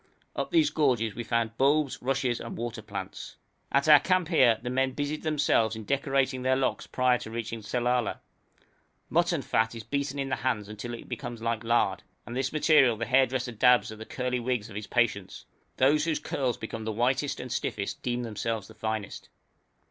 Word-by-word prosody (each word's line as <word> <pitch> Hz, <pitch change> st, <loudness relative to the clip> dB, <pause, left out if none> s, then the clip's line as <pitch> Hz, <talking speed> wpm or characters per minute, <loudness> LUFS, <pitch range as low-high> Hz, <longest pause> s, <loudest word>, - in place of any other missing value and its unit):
Up -, -, -2 dB
these 320 Hz, -3 st, +3 dB
gorges 125 Hz, -8 st, +1 dB
we 120 Hz, -, -5 dB
found 115 Hz, -1 st, -1 dB
bulbs, 140 Hz, +1 st, +2 dB
rushes, 125 Hz, -2 st, 0 dB
and 115 Hz, -, -7 dB
water 120 Hz, -1 st, -4 dB
plants. -, -, -7 dB, 0.4 s
At 140 Hz, +2 st, +2 dB
our 150 Hz, -1 st, +9 dB
camp 185 Hz, -3 st, +1 dB
here 120 Hz, -4 st, +4 dB
our -, -, -1 dB
men 130 Hz, 0 st, +1 dB
busied 145 Hz, +2 st, -3 dB
themselves 140 Hz, -8 st, +2 dB
in 110 Hz, -, -7 dB
decorating 135 Hz, 0 st, 0 dB
their 130 Hz, +1 st, +2 dB
locks 135 Hz, 0 st, -1 dB
prior 125 Hz, -1 st, +2 dB
to -, -, -8 dB
reaching 115 Hz, 0 st, -5 dB
Sellala. 120 Hz, +1 st, 0 dB, 0.9 s
Mutton 170 Hz, -3 st, +2 dB
fat 115 Hz, 0 st, +1 dB
is 115 Hz, -, -7 dB
beaten 140 Hz, +3 st, -2 dB
in 135 Hz, -1 st, -2 dB
the 130 Hz, -, -1 dB
hands 115 Hz, -5 st, -1 dB
till 120 Hz, +1 st, -4 dB
it -, -, -11 dB
becomes 120 Hz, -3 st, -6 dB
like 115 Hz, -1 st, -1 dB
lard, 115 Hz, +1 st, +1 dB, 0.2 s
and 120 Hz, -, -7 dB
this 130 Hz, 0 st, -1 dB
material 150 Hz, -6 st, +4 dB
the 115 Hz, -, -2 dB
hairdresser 130 Hz, -1 st, +2 dB
dabs 120 Hz, +1 st, +4 dB
at 110 Hz, -, -10 dB
the 110 Hz, -, -7 dB
curly 125 Hz, -1 st, -2 dB
wigs 120 Hz, -3 st, -2 dB
of -, -, -10 dB
his 105 Hz, +1 st, -5 dB
patients; 110 Hz, -6 st, -1 dB, 0.3 s
those 150 Hz, +3 st, +4 dB
whose 160 Hz, -2 st, 0 dB
curls 130 Hz, -3 st, -2 dB
become 110 Hz, 0 st, -6 dB
the 110 Hz, -, -2 dB
whitest 130 Hz, +5 st, 0 dB
and 125 Hz, -, -6 dB
stiffest 100 Hz, -, -3 dB
deem 125 Hz, 0 st, -2 dB
themselves 110 Hz, -1 st, -3 dB
the 110 Hz, -, -13 dB
finest. 110 Hz, -2 st, -4 dB
125 Hz, 190 wpm, -28 LUFS, 115-135 Hz, 0.9 s, our